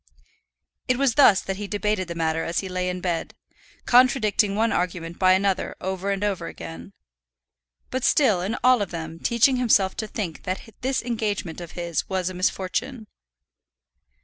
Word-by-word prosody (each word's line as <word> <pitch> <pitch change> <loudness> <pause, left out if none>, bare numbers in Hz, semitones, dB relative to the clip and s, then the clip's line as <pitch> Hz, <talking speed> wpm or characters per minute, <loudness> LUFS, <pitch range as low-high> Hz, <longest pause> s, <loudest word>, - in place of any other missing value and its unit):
It 255 - +2
was 270 -3 +2
thus 225 -7 +6
that 195 0 -4
he 205 0 -5
debated 205 -2 -1
the 170 - -6
matter 165 -1 0
as 170 - -1
he 195 - -6
lay 180 0 -2
in 180 0 -4
bed, 175 -2 -2 0.5
contradicting 230 -5 +4
one 225 +2 +2
argument 170 -1 -2
by 185 -1 +5
another 190 0 0
over 190 +1 -3
and 200 0 -1
over 190 -5 -1
again; 165 +4 -9 1.0
but 260 -1 -2
still 220 -11 +3
in 195 +5 -2
all 250 -2 +5
of 200 - -2
them 165 -1 -6
teaching 235 +5 +3
himself 205 -6 +3
to 215 - -3
think 195 -6 -5
that 185 +1 -3 0.2
this 260 0 -1
engagement 210 -8 -3
of 170 - -9
his 170 -3 -3
was 185 -1 -1
a - - -9
misfortune. 205 +7 -2
195 Hz, 170 wpm, -24 LUFS, 180-225 Hz, 1.0 s, thus